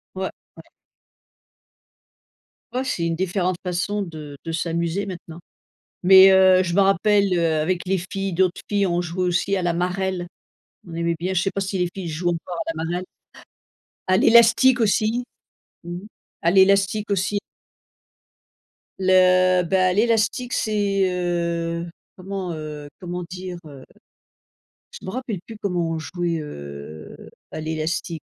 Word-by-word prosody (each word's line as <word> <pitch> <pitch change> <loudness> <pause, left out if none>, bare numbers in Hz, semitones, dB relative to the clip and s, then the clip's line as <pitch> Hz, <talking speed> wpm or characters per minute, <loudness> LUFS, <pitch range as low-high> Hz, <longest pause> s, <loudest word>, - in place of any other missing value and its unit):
Ouais, 190 0 -2 0.3
ouais. - - -11 2.1
Ouais, 255 +1 -1
c'est 170 -9 -1
une 165 0 0
différente 185 -1 -1
façon 180 +4 -1
de 155 -5 -8
de 165 - -3
s'amuser 170 +3 -1
maintenant. 175 -3 -8 0.7
Mais 190 +1 +9
heu, 185 -1 +6
je 170 -1 -2
me 200 - +4
rappelle, 195 0 +3
heu, 165 -2 +1
avec 175 +3 0
les 190 0 +1
filles 195 -1 -3
d'autres 185 0 +1
filles 200 -1 +1
ont 175 0 0
jouait 175 +1 -2
aussi 185 +3 +1
à 185 - -1
la 175 - +1
marelle. 180 +1 -2 0.6
On 165 - -9
aimait 170 0 -1
bien, 185 +2 -2
je 170 - +2
sais 195 - -1
pas 195 - -3
si 195 0 -2
les 180 -1 0
filles 190 -3 -6
jouent 165 +2 -1
encore 175 +1 -4
à - - +1
la 160 0 -4
marelle? 175 +2 -2 1.0
À 185 0 +4
l'élastique 235 +4 +6
aussi, 220 +3 +1 0.6
mmh, 175 +1 -6 0.4
à 170 - +3
l'élastique 195 +2 +3
aussi. 200 +1 0 1.6
Le 185 -1 +4
bah 185 +1 +2
l'élastique 225 +3 +1
c'est, 200 -3 +1
heu, 170 -1 -2 0.3
comment, 185 -1 -5
heu, 150 -2 -7
comment 180 -1 -5
dire, 180 0 -6
heu? 140 -3 -11 1.1
Je - - -11
m'en 185 - -4
rappelle 240 -7 -4
plus 225 - -10
comment 175 -4 -1
on 160 - -2
jouait, 170 +1 -2
heu, 70 - -9 0.2
à - - -6
l'élastique. 160 +1 -3
180 Hz, 145 wpm, -22 LUFS, 170-195 Hz, 2.1 s, Mais